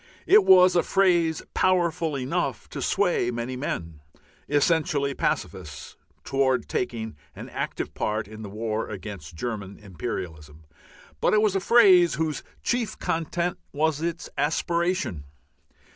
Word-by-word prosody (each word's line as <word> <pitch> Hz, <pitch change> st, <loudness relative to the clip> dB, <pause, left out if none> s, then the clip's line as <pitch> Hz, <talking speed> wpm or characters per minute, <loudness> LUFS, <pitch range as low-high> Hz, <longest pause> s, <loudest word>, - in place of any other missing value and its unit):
It 420 Hz, +1 st, +6 dB
was 185 Hz, -1 st, +7 dB
a 175 Hz, -, +5 dB
phrase 175 Hz, -5 st, +2 dB
powerful 170 Hz, -4 st, +1 dB
enough 130 Hz, 0 st, -2 dB
to -, -, -6 dB
sway 120 Hz, -, +1 dB
many 120 Hz, +1 st, -3 dB
men, 85 Hz, -, -4 dB, 0.5 s
essentially 145 Hz, -1 st, +2 dB
pacifists, 90 Hz, -, -3 dB, 0.3 s
towards 130 Hz, -3 st, +1 dB
taking 110 Hz, -5 st, -3 dB, 0.2 s
an -, -, -9 dB
active -, -, -4 dB
part 110 Hz, 0 st, -2 dB
in 110 Hz, +1 st, -10 dB
the 105 Hz, -, -7 dB
war 110 Hz, +1 st, -3 dB
against 100 Hz, -6 st, -8 dB
German 100 Hz, 0 st, -5 dB
imperialism, 80 Hz, -5 st, -7 dB, 0.5 s
but -, -, +3 dB
it 210 Hz, -, +4 dB
was 205 Hz, -3 st, +2 dB
a -, -, +3 dB
phrase 190 Hz, -5 st, +6 dB
whose 160 Hz, -1 st, -2 dB, 0.2 s
chief 240 Hz, -3 st, -1 dB
content 170 Hz, +2 st, -2 dB
was 155 Hz, 0 st, 0 dB
its 170 Hz, 0 st, -3 dB
aspiration. 170 Hz, -, 0 dB
145 Hz, 130 wpm, -25 LUFS, 110-175 Hz, 0.5 s, was